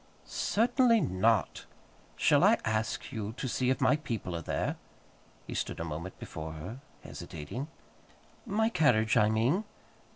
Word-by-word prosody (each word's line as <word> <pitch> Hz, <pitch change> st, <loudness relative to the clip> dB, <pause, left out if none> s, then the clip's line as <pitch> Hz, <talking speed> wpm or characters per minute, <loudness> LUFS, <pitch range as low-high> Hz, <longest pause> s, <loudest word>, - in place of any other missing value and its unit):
"Certainly 230 Hz, +1 st, +3 dB
not. 100 Hz, -, +1 dB, 0.5 s
Shall -, -, +4 dB
I -, -, +6 dB
ask 110 Hz, +1 st, -1 dB
you 110 Hz, -1 st, -4 dB
to 130 Hz, -, -4 dB
see 125 Hz, +1 st, 0 dB
if 130 Hz, -, +1 dB
my 150 Hz, -, +4 dB
people 110 Hz, -, -4 dB
are 85 Hz, -, -3 dB
there?" -, -, -2 dB, 0.7 s
He -, -, -6 dB
stood -, -, -3 dB
a -, -, -2 dB
moment 85 Hz, +4 st, -6 dB
before 80 Hz, 0 st, -7 dB
her 80 Hz, +11 st, -7 dB, 0.2 s
hesitating. 80 Hz, -, -6 dB, 0.8 s
"My 220 Hz, +3 st, +1 dB
carriage, 130 Hz, -, +3 dB
I 105 Hz, -, +5 dB
mean." 120 Hz, -, +2 dB
110 Hz, 140 wpm, -30 LUFS, 95-150 Hz, 0.8 s, I